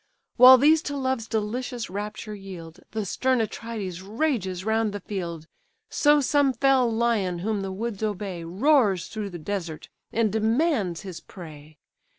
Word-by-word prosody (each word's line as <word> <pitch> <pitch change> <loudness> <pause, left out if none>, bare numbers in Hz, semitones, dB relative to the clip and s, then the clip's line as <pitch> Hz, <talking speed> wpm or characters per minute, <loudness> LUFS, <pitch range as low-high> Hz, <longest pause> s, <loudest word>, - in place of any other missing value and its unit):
While 255 +1 +10
these 305 +4 +5
to 285 - -4
love's 260 -4 -1
delicious 230 +3 -3
rapture 210 +3 -6
yield, 185 -4 -10
The 220 -2 -3
stern 255 +6 +1
Atrides 215 -5 -4
rages 200 - -2
round 220 -1 +1
the 205 - -4
field: 170 -5 -5 0.5
So 295 0 +4
some 285 -1 +2
fell 265 -3 +3
lion 220 -6 0
whom 215 -2 -1
the 195 0 -4
woods 215 +1 -4
obey, 200 -5 -3
Roars 200 - +2
through 215 -2 -5
the 175 - -7
desert, 170 -2 -5 0.2
and 220 -3 +1
demands 220 - +1
his 190 -4 -8
prey. 155 -4 -12
215 Hz, 150 wpm, -25 LUFS, 185-245 Hz, 0.5 s, While